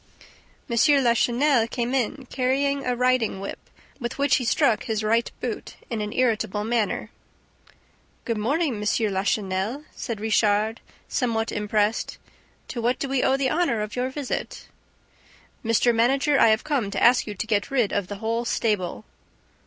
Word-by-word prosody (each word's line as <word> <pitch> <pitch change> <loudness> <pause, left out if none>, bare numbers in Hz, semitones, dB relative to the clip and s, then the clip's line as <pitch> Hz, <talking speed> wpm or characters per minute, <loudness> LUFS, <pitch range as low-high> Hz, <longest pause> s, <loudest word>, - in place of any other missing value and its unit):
M. 235 - -2 0.3
Lachenel 240 +1 +3
came 240 +1 -2
in, 265 +1 -1
carrying 275 +2 0
a 250 - +1
riding 250 -5 +1
whip, 195 - -6 0.4
with 240 -2 -4
which 280 +1 +3
he 250 - -3
struck 225 -1 +2
his 220 -3 -2
right 230 +2 +2
boot - - -5 0.2
in 225 -2 -2
an 210 0 -3
irritable 215 -4 0
manner. 225 -1 -1 1.1
"Good 230 -2 -1
morning, 285 +6 +1
M. - - -6 0.3
Lachenel," 195 +6 -1
said 230 -4 -4
Richard, 215 0 +1 0.3
somewhat 230 -3 -1
impressed. 210 +1 0 0.5
"To 235 - -4
what 245 +2 +1
do 275 - -3
we 270 -1 0
owe 265 - +3
the 270 -1 0
honor 310 -10 +1
of 210 - -6
your 250 +1 -1
visit?" 270 -1 -5 1.0
"Mr. 230 +1 +3
Manager, 270 +5 +3
I - - +7
have 220 0 +3
come 275 -9 -1
to 200 - -2
ask 245 0 +5
you 210 - -5
to 200 - -3
get 210 -3 0
rid 245 -7 +1
of 200 -3 -1
the 205 - -5
whole 225 +3 -2
stable." 200 - -1
235 Hz, 160 wpm, -24 LUFS, 215-255 Hz, 1.1 s, I